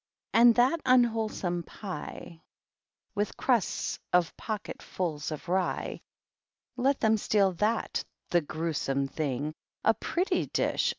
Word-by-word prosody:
And 235 0 +7
that 260 +7 +3
unwholesome 225 -8 +2
pie, 175 -3 -8 0.7
With 205 0 -2
crusts 240 -6 0
of 180 -2 +2
pocketfuls 180 -7 -4
of 155 +2 -6
rye, 185 +1 -1 0.4
— - - -53
• 245 - -3
Let 275 +1 +3
them 220 -1 +3
steal 200 -2 +3
that, 220 +2 0 0.3
the 175 - +4
grewsome 150 -3 -1
thing 145 0 -2 0.3
I - - +6
A - - -2
pretty 345 - -1
dish - - +1
200 Hz, 125 wpm, -29 LUFS, 165-230 Hz, 0.7 s, And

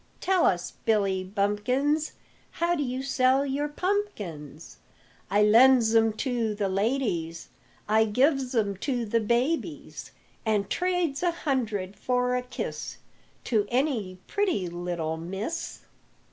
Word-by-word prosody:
Tell 375 -2 +3
us, 175 -1 -1
Billy 195 -4 +1
Bumpkins, 225 +10 0 0.4
How 340 +1 0
d' 325 - -1
you 260 -1 -2
sell 265 0 +3
your 285 +2 -1
pumpkins? 215 - -4 0.5
"I 205 +1 +4
lends 230 +1 +6
'em 225 -1 +4
to 235 -4 0
the 200 -2 -1
ladies, 190 -6 -1 0.4
I 220 +1 +4
gives 260 +3 +1
'em 200 -4 +1
to 245 +1 -2
the 230 +2 +1
babies, 260 +8 -1 0.3
An' 215 -3 +1
trades 355 -5 0
a 355 - +2
hundred 225 - -2
for 250 0 0
a 250 - 0
kiss 250 0 -5 0.5
To 215 -4 +1
any 240 -8 0
pretty 370 - 0
little 170 -2 -3
miss." 195 - -5
235 Hz, 125 wpm, -27 LUFS, 200-275 Hz, 0.5 s, lends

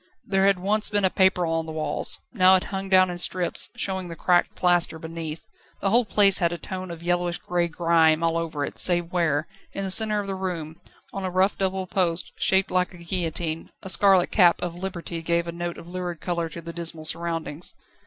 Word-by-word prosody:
There 195 0 +2
had 200 -1 +3
once 210 +4 +2
been 205 -2 +1
a 185 - +2
paper 190 -2 +2
on 165 0 -2
the - - -6
walls, 155 -2 +1 0.2
now 190 -4 +5
it 185 - +1
hung 195 0 -4
down 185 -1 +4
in 175 - -6
strips, 180 0 +1
showing 190 -2 -2
the 165 - -8
cracked 175 +2 +1
plaster 175 -2 +1
beneath. 160 -1 -7 0.3
The 195 - -1
whole 240 +2 +4
place 200 -1 +5
had 170 -2 +1
a 175 - -4
tone 185 +2 -7
of 170 -1 -9
yellowish 175 0 -1
grey 175 -1 -1
grime 165 -1 +2
all 165 0 +1
over 160 -3 -2
it, - - -9
save 175 -1 +3
where, 160 -4 +1 0.3
in 195 - -4
the 190 - -1
centre 215 +1 +5
of 205 - -4
the 195 - -4
room, 175 -4 -5 0.3
on 195 - -5
a 185 - -1
rough 185 +2 +1
double 190 -1 -1
post, 180 -2 -1
shaped 190 0 +1
like 180 0 +1
the 175 -2 -14
guillotine, 165 -2 -2
a 190 - -6
scarlet 190 -1 +4
cap 175 -4 +4
of 175 -1 -3
Liberty 175 -2 -6
gave 170 +1 -1
a - - -3
note 175 0 -5
of 165 - -11
lurid 175 -2 -5
colour 170 -1 -3
to 170 +2 -9
the 170 +1 -7
dismal 165 -2 -4
surroundings. 165 -1 -3
175 Hz, 215 wpm, -24 LUFS, 165-190 Hz, 0.3 s, now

